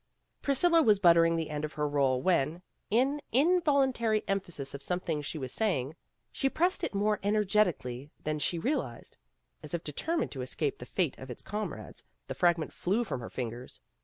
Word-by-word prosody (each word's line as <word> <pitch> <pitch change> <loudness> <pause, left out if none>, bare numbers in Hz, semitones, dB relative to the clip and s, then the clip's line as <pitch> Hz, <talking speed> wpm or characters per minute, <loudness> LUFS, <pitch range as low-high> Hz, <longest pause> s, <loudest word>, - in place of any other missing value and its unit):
Priscilla 330 +4 +4
was 215 -8 +5
buttering 170 -3 +5
the 160 -2 -2
end 150 0 -3
of 155 - -4
her 150 -1 -1
roll 135 -3 +1
when, 170 -1 +1 0.3
in 265 +7 +2
involuntary 270 -7 +3
emphasis 175 -8 -3
of 140 - -7
something 165 -1 -2
she 145 +2 -4
was 130 -4 -4
saying, 160 - 0 0.4
she 270 - 0
pressed 355 +6 +1
it - - -2
more 210 +1 +1
energetically 195 - +1
than 155 0 -1
she 170 - 0
realized. 165 - -3 0.5
As 150 +3 -4
if 170 - -4
determined 320 - -1
to 130 - -5
escape 135 +3 -2
the 125 - -9
fate 175 -7 -1
of 130 - -9
its 125 - -8
comrades, 200 - -5 0.2
the - - -5
fragment 170 -3 +1
flew 205 +7 0
from 195 - -4
her 115 - -7
fingers. 120 0 -6
175 Hz, 175 wpm, -30 LUFS, 145-215 Hz, 0.5 s, was